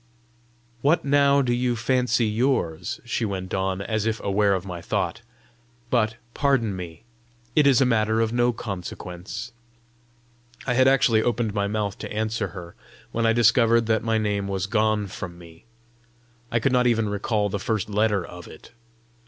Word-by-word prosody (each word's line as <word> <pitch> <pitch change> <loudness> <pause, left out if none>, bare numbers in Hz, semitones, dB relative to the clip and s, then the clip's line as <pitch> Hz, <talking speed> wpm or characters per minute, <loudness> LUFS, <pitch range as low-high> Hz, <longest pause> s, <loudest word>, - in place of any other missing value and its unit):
"What 150 +3 +2
now 140 0 +4
do 120 -2 +1
you 120 0 0
fancy 120 0 +1
yours?" 105 - -1
she 120 -1 -2
went 95 -3 -4
on, 95 0 -1
as 110 0 -1
if 110 -1 -1
aware 100 0 +2
of 95 0 -4
my 90 -3 -6
thought. - - -2 0.7
"But, 115 -2 +2 0.2
pardon 135 -8 +1
me, 90 +1 -8 0.5
it 150 -2 +5
is 135 -2 +5
a - - +5
matter 110 -2 +2
of 115 0 0
no 120 0 +3
consequence." 95 -2 -7 1.1
I 125 - +1
had 130 +1 +4
actually 125 -4 +4
opened 115 -2 0
my 100 0 0
mouth 105 -1 -2
to - - -7
answer 110 +2 -1
her, 85 -3 -10 0.4
when 115 0 +1
I 115 - +4
discovered 115 0 +4
that 110 -1 +1
my 115 -1 +1
name 105 -2 -1
was 95 -1 -2
gone 110 0 +1
from 90 -2 -7
me. 85 -1 -15 0.9
I 115 - +2
could 130 +4 +1
not 125 -1 +3
even 115 -2 +2
recall 105 0 -1
the 100 - -3
first 105 -1 -1
letter 105 -3 +1
of 90 0 -11
it! 80 - -14
110 Hz, 170 wpm, -24 LUFS, 100-120 Hz, 1.1 s, it